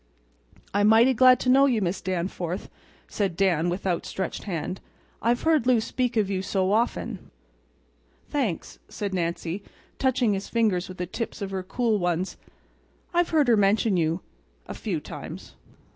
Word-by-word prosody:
"I'm 205 +1 +3
mighty 230 +4 +6
glad 255 +1 +6
to 250 - 0
know 275 +2 +6
you, 245 -5 +2
Miss 185 -1 -1
Danforth," 180 0 -3 0.4
said 195 -5 -2
Dan, 175 -4 +2
with 180 +3 -4
outstretched 185 0 -2
hand. 180 -1 -4 0.4
"I've 240 +1 +1
heard 315 -6 +3
Lou 250 -3 +5
speak 245 +2 -1
of 210 -3 +3
you 190 -1 -1
so 190 0 0
often." 230 +3 -1 1.0
"Thanks," 240 - -2
said 200 -2 -4
Nancy, 170 +1 -2 0.4
touching 255 -4 +2
his 195 0 -4
fingers 210 -7 +1
with 185 - -9
the 180 - -2
tips 225 +6 -5
of 200 -2 -4
her 190 -1 -2
cool 220 +3 0
ones, 175 +1 -1 0.8
"I've 350 0 +2
heard 305 -4 +3
her 235 - +6
mention 205 0 +3
you—a 155 - -4
few - - -3
times." - - -9
200 Hz, 155 wpm, -26 LUFS, 180-235 Hz, 1.0 s, mighty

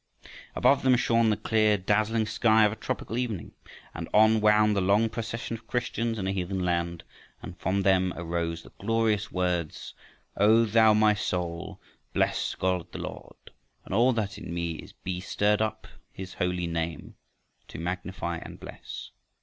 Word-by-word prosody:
Above 140 - +4
them 130 -1 +4
shone 115 -1 +3
the 105 - +1
clear 110 -2 +2
dazzling 110 +3 +1
sky 110 0 +4
of 105 - +2
a - - -5
tropical 115 +1 -4
evening. 115 -8 -3 0.4
And 85 0 -6
on 110 +1 +5
wound 105 0 +4
the 100 - +1
long 100 +4 +3
procession 115 0 -4
of 115 - -23
Christians 115 -2 -1
in 95 - -3
a 95 - 0
heathen 95 -1 -2
land, 85 -1 -1 0.4
and 85 - -8
from 95 +3 0
them 95 -1 +3
arose 85 -1 -3
the - - -15
glorious 110 -1 0
words: 90 -3 -2 0.4
O 110 +3 +5
thou, 110 0 +5
my 105 0 +5
soul, 90 -4 -3 0.3
bless - - 0
God 90 -2 -1
the - - -7
Lord, - - -9 0.3
And - - -6
all 120 +5 +4
that 105 -3 -3
in 90 - -8
me 85 -1 -2
is - - -11
Be 90 -1 -5
stirred 105 +3 +1
up 110 0 -2 0.3
his 95 -1 -8
holy 90 -1 -1
name 85 -1 -4 0.5
To - - -9
magnify 90 0 -4
and - - -10
bless. - - -9
100 Hz, 165 wpm, -27 LUFS, 90-110 Hz, 0.5 s, on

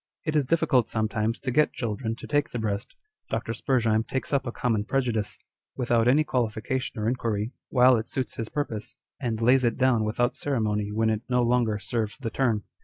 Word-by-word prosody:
It 155 -1 -1
is 145 -3 +3
difficult 135 -5 +2
sometimes 110 +1 -1
to 130 - -2
get 150 +4 +3
children 115 0 -3
to - - -10
take 145 -1 +1
the - - -4
breast. 105 -2 -3 0.3
Dr. 115 0 -2
S. 115 - -7 0.5
takes 130 +2 -3
up 135 -2 +1
a - - -2
common 115 -4 0
prejudice, 120 -4 -1 0.4
without 120 -2 +2
any 140 +5 +5
qualification 125 -1 -2
or 105 - -1
inquiry, 115 -2 -1 0.2
while 125 -1 +6
it 110 - -4
suits 130 -2 -3
his 115 -1 -4
purpose, 120 -5 -4 0.2
and 115 -4 -2
lays 125 +3 +4
it 115 -2 +1
down 130 -4 +3
without 120 +3 0
ceremony 105 -6 -1
when 110 +1 +1
it 110 -1 -1
no 125 -1 +3
longer 120 -3 +2
serves 105 +2 -3
the 125 -5 -4
turn. 115 -6 +1
120 Hz, 190 wpm, -26 LUFS, 110-130 Hz, 0.5 s, while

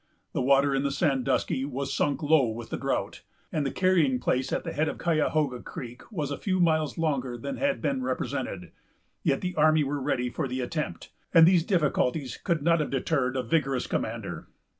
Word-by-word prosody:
The - - 0
water 140 +2 +4
in 135 - +1
the 140 - 0
Sandusky 135 -2 0
was 140 0 -3
sunk 145 +2 0
low 145 -4 +4
with 115 +1 -7
the - - -1
drought, - - -2 0.3
and 150 -3 0
the - - -2
carrying 170 -9 +2
place 130 +1 0
at - - -1
the - - -5
head 155 +1 +1
of - - -5
Cayahoga 155 -5 +1
Creek 125 - -9
was 150 -8 -3
a 140 - -4
few 185 -2 0
miles 155 -4 +2
longer 135 -7 -1
than 140 +4 -5
had 280 0 0
been 270 -2 0
represented; 255 - -3 0.5
yet - - +1
the 180 -1 -2
army 155 -1 +4
were 145 0 -2
ready 125 -1 0
for 145 +1 -2
the 130 +1 -3
attempt, 150 +5 -4 0.2
and 165 -1 +9
these 175 -2 +5
difficulties 150 - 0
could 170 -6 -1
not 170 +1 +4
have 150 - -1
deterred 135 -1 0
a 130 - 0
vigorous 135 0 0
commander. - - -4
145 Hz, 195 wpm, -27 LUFS, 130-160 Hz, 0.5 s, and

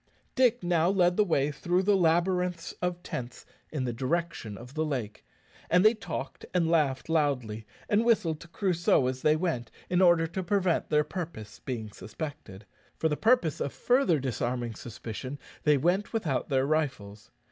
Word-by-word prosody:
Dick 245 -4 +3
now 175 -1 +2
led 180 -2 +3
the 210 - +4
way 150 -6 +1
through 175 +6 0
the 205 +1 +4
labyrinths 180 0 +1
of 180 -1 -2
tents 120 -6 -6 0.3
in 150 -4 -2
the 120 -2 -2
direction 130 -4 -2
of 125 +4 -11
the 155 - 0
lake, 125 -9 -4 0.5
and 180 +4 +4
they 215 - +7
talked 220 - -6
and 170 -2 +3
laughed 145 -6 +1
loudly, 125 -9 0 0.2
and 210 +2 +3
whistled 205 -10 +2
to 170 - -12
Crusoe 175 -6 +2
as 130 0 -2
they 155 0 +4
went, 155 -9 -2 0.2
in 180 0 +3
order 175 -2 +5
to 170 +4 -4
prevent 185 -2 +1
their 150 -1 +3
purpose 150 - -7
being 115 -5 -5
suspected. 110 - -8 0.3
For 160 - +1
the 150 - 0
purpose 220 - +2
of 140 - -1
further 245 - +2
disarming 120 -2 -2
suspicion, 120 +4 -7 0.3
they 150 -1 +5
went 180 - 0
without 165 - -1
their 135 -1 +2
rifles. 120 -9 -2
160 Hz, 170 wpm, -28 LUFS, 130-180 Hz, 0.5 s, they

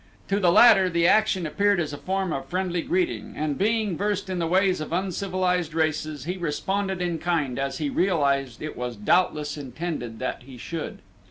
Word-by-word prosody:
To 200 +1 +2
the 180 -4 +4
latter 195 -2 +7
the 170 -1 +1
action 205 -3 +3
appeared 200 +4 +2
as 155 -4 -2
a - - -5
form 190 -2 -1
of 135 - -4
friendly 180 -1 -1
greeting 340 - -1
and, 150 -1 -1
being 215 0 +1
versed 200 0 -2
in 185 - -2
the 165 - 0
ways 185 0 +2
of 155 - -6
uncivilized 180 -2 -1
races, 155 -3 -1
he 180 +5 -3
responded 190 +3 -2
in 170 -2 -2
kind 150 -8 -1
as 135 0 -2
he 150 - -1
realized 140 - +1
it 155 - -5
was 125 -1 -4
doubtless 150 - +1
intended 135 -4 -5
that 130 - -4
he 130 -2 -11
should. 165 +6 -6
175 Hz, 185 wpm, -25 LUFS, 150-190 Hz, -, latter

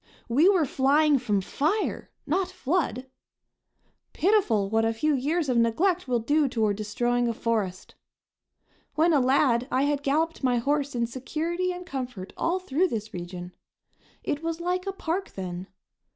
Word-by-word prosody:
We 285 +10 +4
were 365 -6 +3
flying 285 +2 +3
from 210 -5 0
fire, 315 - -1 0.2
not 360 +5 0
flood! 325 -7 -1 1.1
Pitiful 335 - +2
what 220 +2 +1
a 225 0 +1
few 305 +7 +1
years 295 +5 0
of 250 -2 +1
neglect 325 - +2
will 250 -1 +2
do 290 +6 +2
toward 220 -5 0
destroying 240 +3 0
a 230 - -1
forest! 210 -6 -2 1.0
When 330 +2 +4
a 290 - +5
lad 255 -1 +3
I 260 -1 +1
had 285 -1 +1
galloped 310 +3 0
my 250 -2 +3
horse 285 +2 0
in 235 -1 +1
security 320 +9 -2
and 360 0 -7
comfort 250 - -6
all 340 +3 0
through 370 -1 +1
this 220 - -5
region. 175 0 -7 0.7
It 290 - -2
was 330 0 -3
like 360 +2 -2
a - - 0
park 380 +1 -3
then. 185 -1 -5
275 Hz, 155 wpm, -26 LUFS, 230-330 Hz, 1.1 s, a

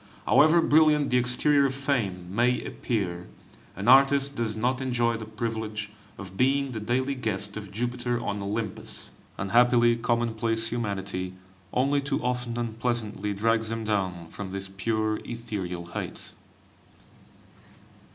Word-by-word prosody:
however 160 +3 +6
brilliant 150 -2 +4
the 125 - +4
exterior 140 +3 +3
of 135 - -4
Fame 115 -11 -1
may 125 +2 +3
appear, 90 -6 -3 0.5
an 100 +4 -4
artist 140 +2 +5
does 115 -2 -1
not 125 +4 0
enjoy 120 -3 +1
the 110 -1 -6
privilege 110 -1 -4 0.3
of 95 -2 -9
being 135 +4 +2
the 115 - -4
daily 130 +5 0
guest 105 -5 -3
of 105 -2 -7
Jupiter 120 +2 -2
on 105 -3 -3
Olympus; 105 0 -4 0.3
unhappily 120 +4 +4
commonplace 115 -1 0
humanity 95 -5 -3 0.4
only 140 +3 +2
too 140 0 -1
often 125 -1 -2
unpleasantly 115 -3 -2
drags 110 +1 +1
him 115 0 -3
down 95 -5 -1
from 100 -2 -7
these 95 0 -5
pure 110 +2 -1
ethereal 100 -7 -5
heights. 85 - -6
115 Hz, 130 wpm, -27 LUFS, 105-125 Hz, 0.5 s, however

